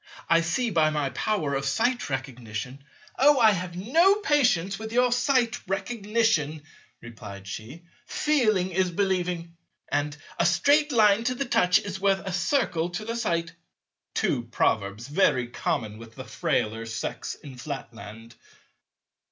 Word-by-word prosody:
I 165 0 +4
see 195 +8 -1
by 160 -4 +3
my 150 -3 -1
power 155 - -1
of 135 0 -1
Sight 235 - 0
Recognition—" 130 -1 -5 0.4
"Oh, 290 +2 +6
I 220 -2 +7
have 180 -2 -4
no 325 - +4
patience 250 - +1
with 220 0 -6
your 245 +1 +3
Sight 245 -1 +2
Recognition," 195 -6 0 0.4
replied 105 -4 -10
she, 120 - -8 0.2
"'Feeling 215 -11 +1
is 185 +1 +1
believing' 175 -2 -1 0.3
and 145 0 -1 0.2
'A - - +3
Straight 290 - +3
Line 215 -3 +4
to 250 +1 0
the 275 - -2
touch 180 -7 +4
is 195 -2 -5
worth 195 0 +1
a 190 - -3
Circle 175 - 0
to 175 +4 -5
the 230 +1 -3
sight'"—two 170 - -3
Proverbs, 110 -1 -1
very 145 -5 +2
common 110 -3 -3
with 115 -1 -13
the - - -8
Frailer 115 +1 -1
Sex 110 -1 -4
in 140 -4 -12
Flatland. 115 -4 -8
175 Hz, 140 wpm, -26 LUFS, 135-225 Hz, 0.4 s, I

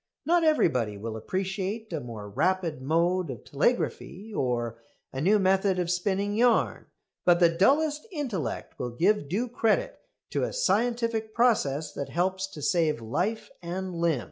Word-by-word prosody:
Not 340 +2 +3
everybody 125 - +2
will 110 +2 -5
appreciate 195 - -3
a 160 - -1
more 115 -5 -8
rapid 165 - 0
mode 170 +4 +1
of 120 -5 -7
telegraphy, 210 - -1
or 120 - -2 0.3
a 135 - -3
new 200 +7 +4
method 190 0 +2
of 175 -1 0
spinning 195 +3 0
yarn, 235 +2 +2 0.4
but 175 -1 +5
the 170 -2 +6
dullest 295 - +2
intellect 240 - -4
will 125 - -2
give 170 - +1
due 220 +9 0
credit 245 - 0 0.3
to - - 0
a - - -1
scientific 230 - 0
process 160 - +2
that 140 - -5
helps 190 +2 0
to 155 -6 -10
save 160 -6 +2
life 145 - -2
and 180 +2 -4
limb. 165 -5 +1
185 Hz, 150 wpm, -27 LUFS, 150-220 Hz, 0.4 s, the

